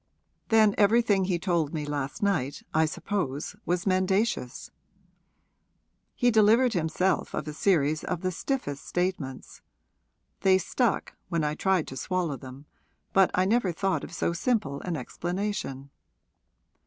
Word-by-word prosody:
'Then 220 -2 +5
everything 205 -2 +4
he 180 -2 0
told 170 -3 0
me 150 -1 -2
last 145 +3 -4
night, 150 -9 0
I 160 0 +4
suppose, 155 -2 -3
was 175 0 0
mendacious: 190 - 0 1.4
he 245 -1 +3
delivered 225 +3 +5
himself 175 +2 0
of 150 - -4
a 150 - -4
series 155 -3 +1
of 180 -2 -3
the 185 -1 -1
stiffest 170 - -3
statements. 175 -8 -3 0.8
They 190 -1 +5
stuck, 225 +5 -1 0.2
when 170 -3 0
I 150 0 0
tried 185 +1 +1
to 130 - -8
swallow 175 -1 -1
them, 135 +1 -11 0.5
but 195 -1 +5
I 185 - +3
never 205 -2 +2
thought 190 +2 -1
of - - -8
so 170 0 -1
simple 175 - -1
an 175 -3 -3
explanation.' 175 - -4
180 Hz, 135 wpm, -27 LUFS, 150-200 Hz, 1.4 s, Then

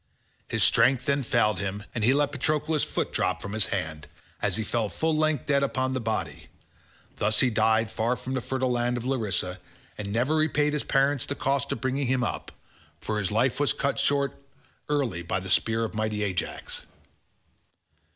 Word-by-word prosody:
His - - +1
strength 125 +2 +4
then 140 0 +2
failed 115 -5 +2
him 100 +1 -3
and 115 - -2
he 120 - +5
let 145 +1 +2
Patroclus' 150 +2 0
foot - - -2
drop 90 0 0
from 100 +2 -6
his 110 -4 +3
hand, 80 -5 -3 0.3
as 100 -3 +1
he 110 - 0
fell 110 -1 -1
full 160 +6 0
length 155 -3 +1
dead 140 -1 +2
upon 130 -1 0
the 130 - -1
body; 95 -10 -3 0.7
thus 105 +1 +2
he 130 - +3
died 110 0 +2
far 115 +3 0
from 130 +1 -6
the 130 - -1
fertile 130 +1 -1
land 120 0 0
of 120 - -5
Larissa, 100 -8 -1 0.4
and 100 -1 -4
never 125 +8 +1
repaid 150 -1 +2
his 150 - -1
parents 135 0 +2
the 140 - -2
cost 135 -1 0
of 115 - -3
bringing 130 +1 0
him 130 0 +1
up, - - -3 0.5
for 110 -1 -2
his 100 -2 -1
life 120 +5 +1
was 145 - +2
cut 140 - -1
short 140 -1 +2 0.6
early 135 - 0
by 85 +2 -2
the 95 0 -6
spear 115 0 +2
of 110 - -6
mighty 110 -1 -1
Ajax. 95 -3 -4
120 Hz, 190 wpm, -27 LUFS, 105-140 Hz, 0.7 s, he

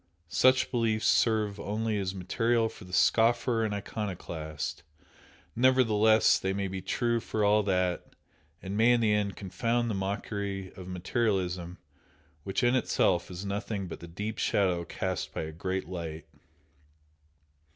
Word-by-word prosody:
Such 130 +7 +3
beliefs 115 -3 0
serve 110 -3 +2
only 110 0 -1
as 95 -1 -3
material 115 +5 +1
for 105 - -13
the 90 - -13
scoffer 115 +4 +3
and 110 - -1
iconoclast, 85 -7 -5 0.7
nevertheless 110 -4 +4
they 95 0 -1
may 100 0 -2
be 95 0 -5
true 120 +5 0
for 110 -1 -1
all 105 +1 +4
that, 90 -3 -1 0.5
and 95 +1 -4
may 115 +3 +5
in 120 - +3
the 110 -2 +3
end 105 -1 0
confound 115 +4 -1
the - - -1
mockery 100 0 -3
of 90 -1 -10
materialism 90 -2 -1 0.7
which 95 +3 -2
in 120 0 +4
itself 90 -8 +1
is 90 +2 -6
nothing 100 0 -3
but 85 - -7
the 85 - -9
deep 105 +6 -5
shadow 90 -4 +1
cast 95 +2 -4
by - - -2
a 80 - -5
great 95 +2 -3
light. 85 -3 -6
100 Hz, 145 wpm, -29 LUFS, 95-115 Hz, 0.7 s, may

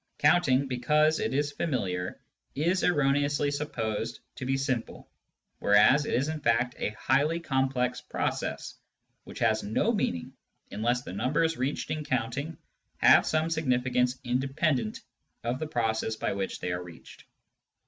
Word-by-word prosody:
Counting, 140 -6 +3
because.it 150 +2 +2
is 145 +2 0
familiar, 95 - -2 0.4
is 170 +6 +1
erroneously 145 -2 +2
supposed 115 -7 -3
to 125 - -6
be 135 0 +1
simple, 130 -4 -3 0.5
whereas 120 +8 +5
it - - 0
is 135 +4 +1
in 155 0 -3
fact 125 -3 +1
a - - 0
highly 145 +6 +2
complex 130 -5 0
process, - - -3 0.5
which - - -10
has 110 -2 +2
no 110 - +1
meaning 90 - -2 0.4
unless 120 +4 0
the - - -8
numbers 160 - +1
reached 130 +3 -2
in 155 -1 -2
counting 140 +5 -2 0.4
have - - +6
some 155 +1 +1
significance 125 -4 +1
independent 130 -1 0 0.4
of 120 +3 -2
the 155 - -3
process 110 -5 -1
by - - -2
which 100 -1 -4
they 90 - -2
are 90 0 -2
reached. 85 -2 -13
130 Hz, 140 wpm, -28 LUFS, 115-150 Hz, 0.5 s, have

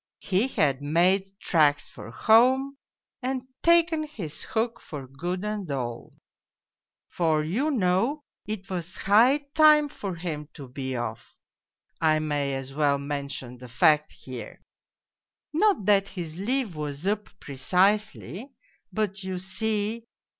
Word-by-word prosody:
He 200 +5 +1
had 145 - +1
made 180 +6 +2
tracks 150 -4 +2
for - - -11
home 255 - +4 0.5
and 260 0 -2 0.2
taken 335 -2 +4
his 215 - -6
hook 230 +1 -2
for 145 -4 -8
good 175 +9 -4
and 210 -4 -3
all; 120 -4 -4 1.0
for 160 -3 +1
you 225 - 0
know 230 +4 +1 0.3
it 210 -2 -5
was 175 -1 -4
jiigh 245 +9 +4
time 305 -1 +6
for 195 -8 -5
him 155 -3 -5
to 140 -3 -9
be 130 +1 -5
off 120 -1 -5 0.7
I 155 -1 +4
may 145 -3 -1
as 135 0 -6
well 145 -1 +2
mention 140 -3 -5
the 125 - -10
fact 150 +5 +3
here; 125 -5 -9 0.9
not 380 - +2
that 200 -1 +4
his 175 -4 -6
leave 235 -2 -1
was 150 +1 -4
up 210 +1 -1
precisely, 190 - 0 0.4
but 205 -2 -2
you 190 -1 -3
see. 210 +4 -2
185 Hz, 130 wpm, -26 LUFS, 145-220 Hz, 1.0 s, time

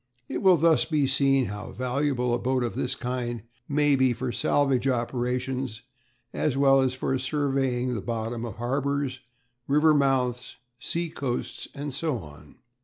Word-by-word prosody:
It - - -3
will 190 -3 +6
thus 165 0 +4
be 150 -3 +1
seen 135 -1 +3
how 105 0 -6
valuable 125 -1 0
a 120 - +1
boat 130 0 0
of 120 - -2
this 125 - -1
kind 120 -2 -3 0.3
may 145 0 +3
be 130 -2 +3
for 125 +1 -3
salvage 135 -1 +1
operations, 125 0 -2 0.5
as 140 -3 0
well 135 -1 +5
as 130 -1 0
for 130 0 -1
surveying 135 -3 0
the 110 - -3
bottom 115 +1 -3
of 115 -4 -5
harbours, 135 +2 -1 0.5
river 150 +2 +4
mouths, 130 -4 +1 0.2
sea 170 +6 -2
coasts, 125 -5 -4
and 145 -1 -5
so 150 -1 -1
on. 75 -5 -12
130 Hz, 155 wpm, -26 LUFS, 120-140 Hz, 0.5 s, will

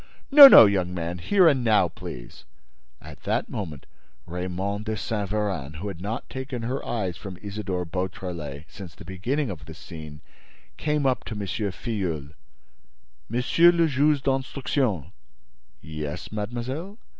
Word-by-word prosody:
"No, 285 0 +13
no, 180 - +10
young 90 -3 0
man, 85 0 -4
here 185 - +4
and 135 -5 +3
now, 105 -5 +4
please." - - -10 0.6
At - - -12
that - - -1
moment 80 -9 -6 0.4
Raymonde 95 +4 -3
de 110 -1 -2
Saint 105 -3 -3
Véran, 95 -9 -2
who 95 +7 -5
had 90 -3 -8
not 110 +5 -4
taken 130 -2 -5
her 130 +4 -3
eyes 95 -7 -3
from 95 -2 -8
Isidore 100 -3 -4
Beautrelet 85 -4 -5
since 90 -5 -11
the 80 - -12
beginning 120 - -2
of 80 -5 -9
this 80 0 -11
scene, 80 -4 -10 0.5
came 150 - -1
up 130 -1 +1
to 110 - -5
M. 105 - -4
Filleul: 95 -7 -3 1.0
"Monsieur 125 +9 +4
le 170 -1 +3
Juge 145 -1 +2
d'Instruction—" 130 - -1 0.7
"Yes, 75 +1 -6
mademoiselle?" 120 - -5
100 Hz, 145 wpm, -25 LUFS, 85-125 Hz, 1.0 s, No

